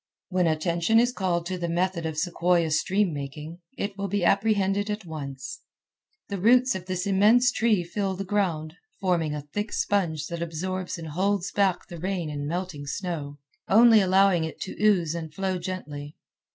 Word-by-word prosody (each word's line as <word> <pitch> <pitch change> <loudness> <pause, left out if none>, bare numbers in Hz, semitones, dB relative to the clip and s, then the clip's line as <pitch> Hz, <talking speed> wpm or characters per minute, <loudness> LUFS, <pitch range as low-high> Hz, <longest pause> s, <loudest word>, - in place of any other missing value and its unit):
When 180 -2 +2
attention 170 +6 +2
is 245 +1 +2
called 175 -6 -1
to 185 0 -3
the 170 -1 -2
method 175 -1 0
of 160 -1 -5
sequoia 170 0 +1
stream 185 +4 +1
making, 150 +4 -7 0.2
it 200 0 -4
will 200 - -1
be 195 -1 0
apprehended 200 0 +2
at 210 -1 -3
once. 150 - -6 0.7
The 200 -2 -4
roots 250 +6 +5
of 185 -1 -6
this 185 -1 -2
immense 215 +6 +4
tree 220 -6 +2
fill 190 +2 -2
the 195 +1 -5
ground, 175 -6 -1 0.3
forming 170 -5 0
a 150 - -4
thick 205 +1 -2
sponge 165 -7 0
that 170 0 -5
absorbs 180 +3 -3
and 160 -2 -7
holds 190 +4 0
back 195 -3 +1
the 170 - -9
rain 180 -3 -2
and 145 -1 -4
melting 170 -3 -4
snow, 145 -2 -4 0.3
only 225 0 +7
allowing 190 -2 +4
it 160 - -5
to 190 - -5
ooze 180 -7 +3
and 165 -2 -5
flow 190 +2 -2
gently. 150 -5 -6
180 Hz, 175 wpm, -26 LUFS, 160-200 Hz, 0.7 s, only